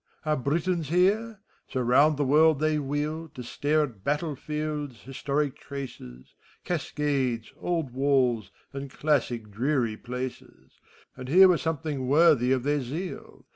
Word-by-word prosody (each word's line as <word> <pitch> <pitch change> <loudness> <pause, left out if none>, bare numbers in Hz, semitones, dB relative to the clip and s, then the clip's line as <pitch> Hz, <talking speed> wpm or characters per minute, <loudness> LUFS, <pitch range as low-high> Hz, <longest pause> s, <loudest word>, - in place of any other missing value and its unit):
Are 155 0 +2
Britons 160 +4 -1
heref 205 +6 +2 0.3
So 130 - -2
round 135 +5 +4
the 145 - +1
world 155 +3 +5
they 155 0 +1
wheel, 150 +3 -3
To 125 - -6
stare 150 +5 +1
at 115 -10 -7
battle 150 +3 -1
fields, 150 -3 -4
historic 140 +1 -2
traces. 95 - -9 0.3
Cascades, 140 -8 -1
old 165 -7 -2
walls, 130 -6 +1 0.2
and 140 0 -6
classic 125 -7 -1
dreary 120 0 0
places; 125 +2 -8 0.4
And 130 0 -8
here 190 +5 +8
were 180 -2 +3
something 155 -5 -3
worthy 145 -3 +4
of 130 -2 +1
their 145 +1 +1
zeal. 160 +9 -7
145 Hz, 135 wpm, -27 LUFS, 130-155 Hz, 0.4 s, here